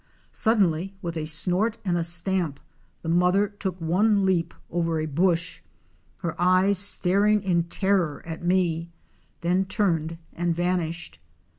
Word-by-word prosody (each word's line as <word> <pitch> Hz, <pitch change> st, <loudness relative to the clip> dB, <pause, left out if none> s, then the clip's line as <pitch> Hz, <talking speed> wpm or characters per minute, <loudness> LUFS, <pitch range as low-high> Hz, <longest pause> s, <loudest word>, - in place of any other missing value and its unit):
Suddenly 195 Hz, -4 st, +1 dB
with 170 Hz, -1 st, -4 dB
a 155 Hz, -1 st, -3 dB
snort 185 Hz, +8 st, +1 dB
and 180 Hz, -2 st, 0 dB
a 170 Hz, -, 0 dB
stamp 170 Hz, -3 st, +1 dB, 0.4 s
the -, -, -7 dB
mother 180 Hz, +4 st, +3 dB
took 195 Hz, -3 st, -5 dB
one 195 Hz, +5 st, +2 dB
leap 175 Hz, -3 st, +1 dB, 0.2 s
over 165 Hz, -1 st, -1 dB
a 155 Hz, -, -2 dB
bush, 170 Hz, +3 st, 0 dB, 0.6 s
her 170 Hz, -4 st, -2 dB
eyes 185 Hz, +2 st, +4 dB
staring 200 Hz, +1 st, +4 dB
in 170 Hz, -3 st, +1 dB
terror 180 Hz, -3 st, 0 dB
at 165 Hz, 0 st, -7 dB
me, 175 Hz, -2 st, 0 dB, 0.5 s
then 180 Hz, +2 st, +1 dB
turned 165 Hz, -5 st, -1 dB, 0.2 s
and 170 Hz, -1 st, -1 dB
vanished. 170 Hz, -, -2 dB
175 Hz, 135 wpm, -25 LUFS, 165-190 Hz, 0.6 s, eyes